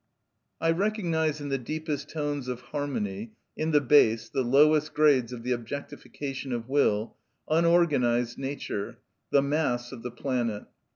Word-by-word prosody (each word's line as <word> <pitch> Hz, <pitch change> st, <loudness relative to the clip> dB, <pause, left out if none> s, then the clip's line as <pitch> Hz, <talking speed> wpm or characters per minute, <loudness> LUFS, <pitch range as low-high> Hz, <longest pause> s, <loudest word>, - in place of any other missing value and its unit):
I 165 Hz, -, +2 dB
recognise 165 Hz, -5 st, 0 dB
in 145 Hz, -, -4 dB
the 135 Hz, -1 st, 0 dB
deepest 150 Hz, +2 st, -4 dB
tones 145 Hz, -4 st, -3 dB
of 125 Hz, -1 st, -4 dB
harmony, 115 Hz, -7 st, -4 dB, 0.2 s
in 155 Hz, -, -1 dB
the 150 Hz, -2 st, +5 dB
bass, 115 Hz, -5 st, +4 dB
the 135 Hz, -, -1 dB
lowest 150 Hz, +4 st, +4 dB
grades 140 Hz, -6 st, +4 dB
of 120 Hz, -2 st, -7 dB
the 125 Hz, -, -2 dB
objectification 135 Hz, +2 st, -5 dB
of 115 Hz, -1 st, -4 dB
will, 120 Hz, -6 st, +1 dB, 0.3 s
unorganised 150 Hz, -8 st, +3 dB
nature, 135 Hz, -7 st, -4 dB, 0.3 s
the 140 Hz, -, +4 dB
mass 140 Hz, -5 st, 0 dB
of 125 Hz, -3 st, -8 dB
the 125 Hz, -, -4 dB
planet. 120 Hz, -4 st, -2 dB
140 Hz, 140 wpm, -27 LUFS, 120-150 Hz, 0.3 s, the